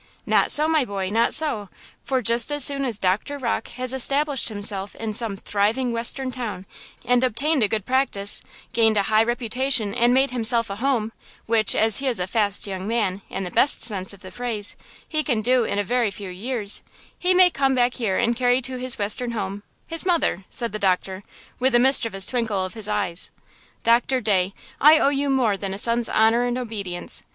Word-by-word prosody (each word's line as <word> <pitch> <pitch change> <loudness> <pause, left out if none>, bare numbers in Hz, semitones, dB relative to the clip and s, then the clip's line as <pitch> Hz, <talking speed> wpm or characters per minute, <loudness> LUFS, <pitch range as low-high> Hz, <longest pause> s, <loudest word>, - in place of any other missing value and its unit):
"Not - - +2
so, 300 +1 +6
my 315 -3 +2
boy–not 200 +1 -1
so–for 260 - -2
just 235 +3 +2
as 290 -1 +2
soon 275 0 +3
as 235 -5 -1
Doctor 205 +10 -1
Rocke 245 -4 -3
has 255 0 0
established 275 +1 +2
himself 205 -2 -2
in 220 -1 -5
some 215 -2 0
thriving 215 +6 -1
western 240 +3 -1
town 225 -7 -6 0.4
and 245 0 +2
obtained 280 +4 +1
a 215 - +3
good 215 -2 -3
practice, 255 -6 +1 0.3
gained 225 -2 +2
a 200 - +2
high 215 - +5
reputation 240 -1 0
and 240 +1 +2
made 265 +2 +2
himself 230 -2 +1
a 195 - -6
home–which, 225 -3 0
as 220 -2 +5
he 275 - -1
is 245 -6 +1
a 180 - -1
fast 205 0 +1
young 190 -1 -6
man, 210 -4 -1
in - - -5
the 180 - -6
best 280 - +3
sense 195 -5 0
of 200 -1 -11
the 185 - -11
phrase–he 245 +6 -3
can 245 -7 -1
do 250 0 +2
in 200 - -3
a 205 - 0
very 240 +1 0
few 195 -1 -9
years–he 230 - -2
may 365 -1 +6
come 270 -3 0
back 245 0 +1
here 215 -7 -2
and 235 +1 0
carry 245 +1 +2
to 260 0 -5
his 250 0 +3
western 225 +4 -1
home–his 205 - -4
mother," 335 - 0
said 235 -3 -2
the 215 - -6
doctor, 190 0 -1 0.4
with 260 0 +1
a - - +6
mischievous 230 -7 +3
twinkle 220 -6 -2
of 185 - -8
his 220 -2 -2
eyes. 200 -5 -1 0.5
"Doctor 240 +3 +2
Day, 195 -4 0 0.2
I 305 +3 +7
owe 280 - +2
you 285 0 -1
more 250 -6 +1
than 195 -1 -5
a - - -7
son's 235 +2 +1
honor 225 +2 +2
and 245 0 -2
obedience! 205 -8 -3
230 Hz, 190 wpm, -22 LUFS, 205-255 Hz, 0.5 s, I